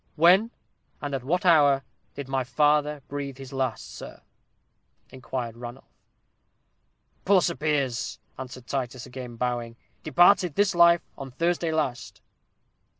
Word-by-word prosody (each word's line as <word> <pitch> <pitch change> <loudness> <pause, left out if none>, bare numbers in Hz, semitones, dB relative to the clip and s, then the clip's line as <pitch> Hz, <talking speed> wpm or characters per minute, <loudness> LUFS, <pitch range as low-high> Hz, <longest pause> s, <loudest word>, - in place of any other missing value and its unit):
"When, 180 +8 +5 0.5
and 145 -1 -5
at 135 -2 -3
what 175 +7 -1
hour, 145 -5 +5 0.3
did 140 -2 -6
my 135 -1 -1
father 150 +2 +1
breathe 140 -2 -5
his 135 -1 -10
last, 130 -3 -3
sir?" - - -10 0.9
inquired 125 -2 -5
Ranulph. 120 +2 -10 1.3
"Poor 195 -1 +5
Sir 175 - 0
Piers," 145 -6 -1 0.2
answered 125 -1 -8
Titus, 130 -2 -4
again 125 -2 -8
bowing, 120 -1 -3 0.3
"departed 175 +1 +4
this 205 -1 +2
life 170 0 +5 0.2
on 135 -1 -6
Thursday 170 +4 -1
last." 135 -7 -3
140 Hz, 125 wpm, -26 LUFS, 125-165 Hz, 1.3 s, When